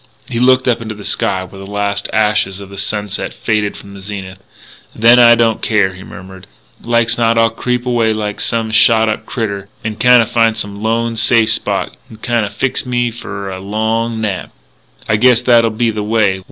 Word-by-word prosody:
He 115 -2 -3
looked 130 +1 +3
up 120 -2 +1
into 110 -1 -6
the 105 - -10
sky, 95 -1 0
where 95 +1 -12
the 95 - -11
last 100 -1 -2
ashes 105 -3 +1
of 100 -1 -9
sunset 105 -1 -3
faded 105 -2 -1
from 100 0 -12
the 100 - -11
zenith.... 95 -1 -7 0.6
"Then 120 +2 +5
I 120 -1 +7
don't 115 -1 +1
care," 100 -4 +1
he 95 - -12
murmured. 95 0 -12 0.3
"Like's 115 0 +1
not 115 0 +2
I'll 115 -1 +3
creep 125 +2 -3
away 120 -3 +1
like 105 -1 -3
some 115 -1 -1
shot 110 0 +4
up 110 0 -4
critter, 100 -4 -4 0.2
n'kinda 115 +2 +4
find 115 0 +1
some 100 -2 -5
lone, 115 +1 -1
safe 110 0 +3
spot, - - -2
n'kinda 110 -1 -2
fix 115 +6 -2
me 120 -1 -1
f'r 100 -4 -7
a - - -8
long 110 +3 -2
nap.... 105 -4 -3 0.6
I 110 - +2
guess 125 +1 +4
that'll 120 -2 +4
be 115 +1 -1
the 105 -1 -4
way 105 -3 +1
110 Hz, 185 wpm, -15 LUFS, 100-115 Hz, 0.6 s, I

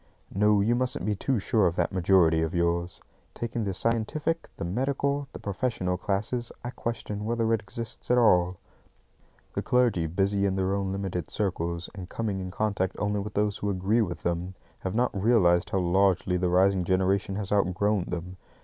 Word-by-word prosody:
No, 105 +1 +4
you 110 +4 +2
mustn't 125 +1 0
be 105 - +1
too 130 +6 0
sure 105 0 +2
of 85 - -1
that - - 0
majority 85 -3 +4
of 80 +1 -2
yours. 85 0 0 0.3
Taking 115 -1 -3
the 100 - -1
scientific, 115 - 0
the - - -4
medical, 140 +7 -1
the - - -8
professional 100 -3 -2
classes, 105 +6 -2
I 120 - -4
question 110 -4 -4
whether 115 0 +1
it 110 - +1
exists 115 +3 -8
at 125 - +4
all. 90 -6 +4 1.0
The - - -1
clergy, 120 -10 +2
busy 100 +4 +1
in 95 - -1
their 95 0 0
own 100 -1 -1
limited 95 -4 -3
circles, 85 -4 -2
and 95 -3 -8
coming 105 -4 -2
in 95 -1 -5
contact 95 -1 -1
only 105 0 0
with 105 +1 -6
those 105 0 +1
who 100 - -1
agree 100 +4 +1
with 90 -5 -3
them, 85 +2 -2 0.2
have 95 +1 -4
not 125 +2 +1
realised 95 -4 +3
how - - 0
largely 95 0 +2
the 90 0 +1
rising 95 +1 +3
generation 95 +2 +1
has 100 -1 -4
outgrown 100 0 +1
them. 90 +1 -5
100 Hz, 180 wpm, -27 LUFS, 90-110 Hz, 1.0 s, No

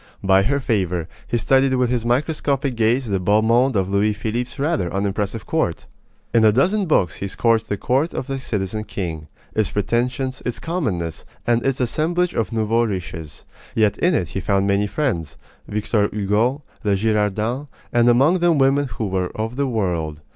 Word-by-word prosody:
By 95 0 +5
her 140 +8 +1
favor, 90 - -1 0.2
he 120 - 0
studied 130 +3 +3
with 125 -1 +1
his 120 -3 0
microscopic 140 +1 0
gaze 115 +3 +1
the 100 -2 0
beau 105 +4 +3
monde 120 +3 +3
of 95 -2 +1
Louis 100 +2 +2
Philippe's 115 +5 -3
rather 145 - 0
unimpressive 100 +2 -2
court. - - -1 0.5
In 115 -1 +4
a 110 - +7
dozen 185 - +2
books 95 - +2
he 100 - -3
scourged 115 +2 +1
the 100 - -1
court 135 - +1
of - - -2
the 135 0 -3
citizen 105 -3 -3
king 80 -7 -5 0.3
its 110 -2 +1
pretensions, 125 +5 -1
its 125 - -3
commonness, 105 - -3 0.2
and 120 0 +2
its 135 -1 0
assemblage 170 +8 0
of 115 - -1
nouveaux 115 +1 +1
riches. 85 -6 -6 0.3
Yet 105 -2 +3
in 180 -1 +3
it 85 - 0
he - - -3
found 100 0 +1
many 100 +1 +2
friends 100 - -2 0.3
Victor 105 0 0
Hugo, 105 +7 0 0.2
the 100 -2 +1
Girardins 110 +5 0 0.3
and 120 0 +4
among 140 +10 +4
them 170 -2 +3
women 135 +1 +3
who 110 -2 -4
were 95 -2 -1
of 110 +2 -3
the 140 +1 0
world. 85 - -2
115 Hz, 175 wpm, -21 LUFS, 100-130 Hz, 0.5 s, a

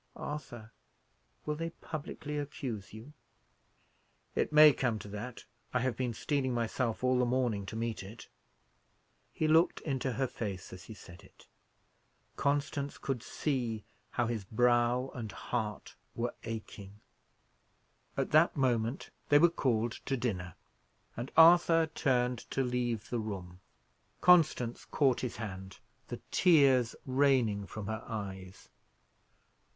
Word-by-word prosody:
Arthur, 120 -7 -7 0.7
will 150 - -1
they 165 +2 -3
publicly 150 -2 -7
accuse 125 -8 -5
you?" 115 +7 -11 1.2
"It - - 0
may 150 -1 +8
come 120 -5 0
to 105 - -9
that; 110 +5 -7 0.3
I 125 - +3
have 130 -2 0
been 125 -1 -2
steeling 130 0 -1
myself 115 +1 -1
all 130 0 +3
the - - +3
morning 120 -5 0
to 105 - -6
meet 115 0 -3
it." 105 +4 -10 1.0
He 155 - -1
looked 160 +2 +4
into 135 -3 -2
her 135 +4 0
face 100 -6 -5
as 90 -1 -10
he 110 - -10
said 85 -2 -13
it. - - -20 0.9
Constance 145 0 -1
could 135 -4 -3
see 120 -7 -2 0.2
how 120 - 0
his 115 -3 -2
brow 120 +4 +2
and 115 -4 -6
heart 110 -3 -4 0.2
were 120 +1 -2
aching. 105 -2 -7 1.2
At - - -1
that 155 +1 +4
moment 120 -2 0 0.2
they 145 - +7
were 170 +3 +6
called 120 -7 0 0.2
to 135 - 0
dinner, 95 -8 -3 0.6
and 120 +3 -5
Arthur 165 0 +7
turned 125 -6 0
to 135 - 0
leave 120 -3 -2
the 120 - 0
room. 95 -5 -6 0.6
Constance 155 -9 +4
caught 135 -4 +2
his 125 -3 -4
hand, 95 -3 -7 0.3
the - - -6
tears 140 -9 +4
raining 130 -7 +2
from 105 -2 -7
her 110 +2 -4
eyes. 95 -4 -7
120 Hz, 135 wpm, -32 LUFS, 110-140 Hz, 1.2 s, may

